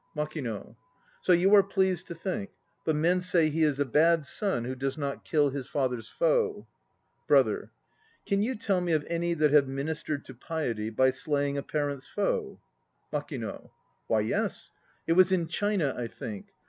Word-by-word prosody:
MAKINO. 150 -8 -4 0.5
So - - +2
you 180 +3 +5
are 205 - +9
pleased 190 -2 0
to 170 - -6
think; 195 +4 -3 0.4
but 160 - +2
men 175 +4 +2
say 170 -4 +2
he 160 +2 -1
is 150 -3 +2
a 145 - +2
bad 160 +3 +3
son 190 - -1
who 125 +2 -3
does 135 +2 -3
not 140 -2 -3
kill 145 -3 +2
his 135 -1 -5
father's 130 -5 -2
foe. - - +1 0.6
BROTHER. - - +3 0.6
Can 200 0 +1
you 250 +5 0
tell 200 -4 0
me 175 -2 0
of 150 -2 +1
any 170 0 -1
that 150 -2 +3
have 145 -2 +5
ministered 145 +2 -3
to 130 - -10
piety 120 -5 -3
by 130 +4 +3
slaying 145 0 -1
a 140 - -1
parent's 145 -2 -3
foe? 415 - -2 0.5
MAKINO. - - -5 0.4
Why, - - +2
yes. - - -2 0.3
It 165 - +2
was 185 +1 +5
in 180 -3 +2
China, 170 -4 0
I 120 - -3
think. 200 - -7
160 Hz, 175 wpm, -28 LUFS, 140-185 Hz, 0.6 s, are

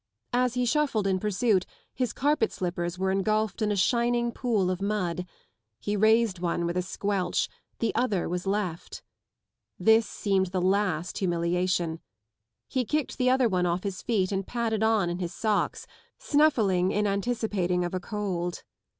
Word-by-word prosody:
As 250 0 +2
he 250 0 +1
shuffled 255 -6 +1
in 190 -1 +1
pursuit 210 -1 +1 0.3
his 250 -4 -1
carpet 290 -4 +1
slippers 175 -2 -3
were 190 +1 0
engulfed 215 +3 0
in 210 -1 +1
a - - +1
shining 235 +4 +2
pool 220 -8 0
of 185 +1 -3
mud: 180 -4 -1 0.5
he 205 - -2
raised 220 -2 +3
one 170 -1 -1
with 170 +1 -2
a 180 - +1
squelch, 195 +1 -1 0.3
the 230 - 0
other 210 -8 0
was 180 +2 -3
left. 195 -4 -3 0.7
This 220 -1 +4
seemed 195 -2 0
the 185 +1 -2
last 185 -2 0
humiliation. 175 -1 0 0.7
lie 260 -2 +2
kicked 300 +4 -2
the 255 0 +3
other 255 -1 +4
one 180 -4 +1
off 175 +1 -1
his 195 -2 -4
feet 205 -6 0
and 195 -1 -2
padded 230 -3 -1
on 220 -4 +3
in 175 +1 -3
his 175 -1 -4
socks, 215 -3 0 0.3
snuffling 215 -12 +3
in 210 0 +1
anticipating 200 -4 0
of 175 - -4
a 185 - -1
cold. 185 -4 -3
200 Hz, 160 wpm, -27 LUFS, 180-225 Hz, 0.7 s, This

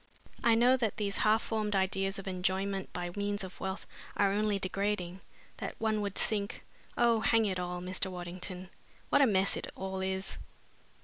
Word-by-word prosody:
I 235 -2 +6
know 245 +3 +5
that 225 -5 -1
these 200 -2 0
half 215 +1 +4
formed 215 -2 -1
ideas 195 0 +1
of 195 - -7
enjoyment 190 +1 0
by 175 -1 -3
means 205 0 -1
of 185 -1 -8
wealth 190 0 -3 0.3
are 200 -1 +4
only 210 0 +2
degrading, 190 -1 -2 0.4
that - - -4
one 215 -1 +1
would 200 -1 -3
sink 205 -2 +1 0.3
oh, 235 -2 +4
hang 225 0 +4
it 190 -3 -1
all, 180 0 -3
Mr. 185 +1 -2
Waddington, 180 +1 -6 0.4
what - - +5
a 275 - +7
mess 195 -3 +3
it - - -4
all 190 0 -4
is!" 190 0 -2
195 Hz, 175 wpm, -32 LUFS, 185-210 Hz, 0.4 s, a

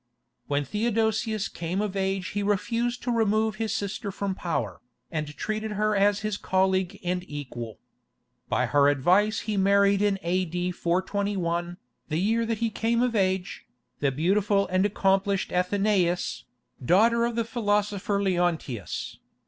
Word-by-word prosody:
When 145 0 0
Theodosius 220 - 0
came 170 +3 -4
of 205 -2 -2
age 190 -1 -1
he 205 - -2
refused 230 +4 -1
to 245 - -1
remove 220 -2 +1
his 220 -2 -2
sister 205 0 -3
from 200 0 -2
power, 115 - -3 0.3
and 155 -2 -2
treated 215 0 -3
her 215 +1 +1
as 200 +1 +3
his 215 -1 -2
colleague 190 -1 +1
and 180 0 -1
equal. 120 -7 -6 0.7
By - - +2
her 145 -1 +4
advice 185 +10 +3
he 215 -2 -2
married 200 +1 +4
in 205 -1 +2
A.D. 180 0 -1
421, 175 -1 -1 0.3
the 155 - 0
year 225 +5 +1
that 225 -1 -1
he 230 +1 -1
came 230 +3 +1
of 245 -2 0
age, 190 -2 -1 0.3
the 140 -2 +1
beautiful 195 +7 +2
and 185 +2 +3
accomplished 195 -1 +1
Athenaïs, 180 -6 +1 0.4
daughter 225 - +4
of 235 0 0
the 230 -1 0
philosopher 205 -3 0
Leontius. 175 - -2
195 Hz, 140 wpm, -26 LUFS, 180-215 Hz, 0.7 s, her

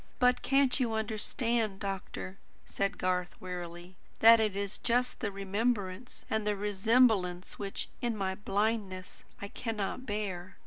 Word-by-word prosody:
"But 250 0 +4
can't 275 0 +3
you 240 -3 +1
understand, 220 -1 -1
doctor," 195 -1 -5 0.3
said 200 +1 -1
Garth 180 -1 -1
wearily, 175 0 -7 0.2
"that 230 +1 +8
it 215 -3 +1
is 200 0 -3
just 250 +1 +1
the 215 -4 -2
remembrance 200 +2 -2
and 220 -1 -1
the 210 - +2
resemblance 205 -2 +2
which, 200 -1 -3
in 240 -3 -1
my 190 -1 -1
blindness, 200 -1 -2 0.2
I - - -3
cannot 225 +2 -4
bear? 195 -4 -4
205 Hz, 135 wpm, -31 LUFS, 190-230 Hz, 0.3 s, that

